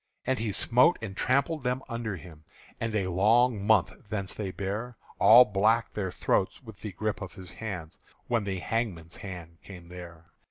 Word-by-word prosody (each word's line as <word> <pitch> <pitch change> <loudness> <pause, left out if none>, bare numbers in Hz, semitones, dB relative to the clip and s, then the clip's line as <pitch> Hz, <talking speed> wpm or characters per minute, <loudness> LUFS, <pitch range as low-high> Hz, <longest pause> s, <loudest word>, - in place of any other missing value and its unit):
And 130 -1 0
he 110 -2 -1
smote 125 - +4
and 100 -4 -6
trampled 140 +7 +1
them 125 +1 -1
under 115 -4 -3
him; 80 -2 -12 0.4
And 115 -1 -2
a 95 -3 0
long 110 +4 +3
month 105 -3 +3 0.2
thence 100 -3 -2
they 105 -3 -4
bare 105 +5 -4 0.2
All 120 +3 +9
black 110 +3 +2
their 95 -3 -2
throats 95 +9 0
with 110 -4 -12
the 105 -3 -6
grip 110 +3 -2
of 95 - -6
his 95 -2 -10
hands 90 -8 -7 0.3
When 120 -3 0
the 95 -1 -2
hangman's 90 -5 -3
hand 85 -4 -9
came 90 -3 -11
there. 85 -2 -11
105 Hz, 175 wpm, -28 LUFS, 95-115 Hz, 0.4 s, All